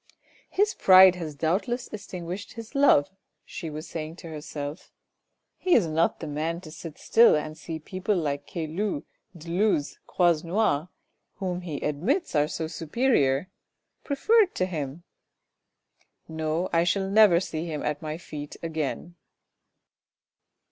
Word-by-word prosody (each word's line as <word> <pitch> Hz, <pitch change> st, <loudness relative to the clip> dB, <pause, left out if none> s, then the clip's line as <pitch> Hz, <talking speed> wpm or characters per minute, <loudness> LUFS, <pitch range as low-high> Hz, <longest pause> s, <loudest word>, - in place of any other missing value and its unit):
" -, -, -30 dB
His 415 Hz, +3 st, +1 dB
pride 185 Hz, -1 st, +8 dB
has 160 Hz, -4 st, -6 dB
doubt 165 Hz, -, 0 dB
less 240 Hz, +1 st, -3 dB
extinguished 185 Hz, -1 st, -7 dB
his 230 Hz, +1 st, -9 dB
love," 275 Hz, -, +4 dB, 0.3 s
she 165 Hz, -, -6 dB
was 155 Hz, +2 st, -7 dB
saying 160 Hz, 0 st, -6 dB
to 170 Hz, -, -10 dB
herself. 150 Hz, 0 st, -7 dB, 0.3 s
" -, -, -54 dB
He 365 Hz, -, +3 dB
is 220 Hz, -, +4 dB
not 160 Hz, +1 st, +1 dB
the -, -, -6 dB
man 155 Hz, +3 st, -2 dB
to 155 Hz, -4 st, -11 dB
sit 160 Hz, -1 st, -9 dB
still 230 Hz, -4 st, +5 dB
and 155 Hz, 0 st, -3 dB
see 160 Hz, 0 st, -6 dB
people 185 Hz, +5 st, -2 dB
like 145 Hz, -4 st, -2 dB
Caylus, 170 Hz, 0 st, -3 dB, 0.3 s
de 165 Hz, +1 st, -11 dB
Luz, 175 Hz, -4 st, +1 dB
Croisenois 170 Hz, -1 st, +1 dB, 0.5 s
whom 180 Hz, -2 st, -3 dB
he 170 Hz, -4 st, -5 dB
admits 195 Hz, -, -1 dB
are 150 Hz, -1 st, +3 dB
so 160 Hz, -, -3 dB
superior, 160 Hz, -, +1 dB, 0.5 s
preferred 395 Hz, +8 st, +3 dB
to 185 Hz, -, +1 dB
him. 155 Hz, -3 st, -5 dB, 1.2 s
No, 160 Hz, +2 st, -2 dB
I 165 Hz, 0 st, +4 dB
shall 190 Hz, +2 st, +1 dB
never 200 Hz, -3 st, +6 dB
see 165 Hz, -2 st, -4 dB
him 155 Hz, -3 st, -4 dB
at 150 Hz, -1 st, -2 dB
my 155 Hz, 0 st, -4 dB
feet 150 Hz, -3 st, -8 dB
again." 160 Hz, +1 st, -3 dB
165 Hz, 145 wpm, -26 LUFS, 155-195 Hz, 1.2 s, pride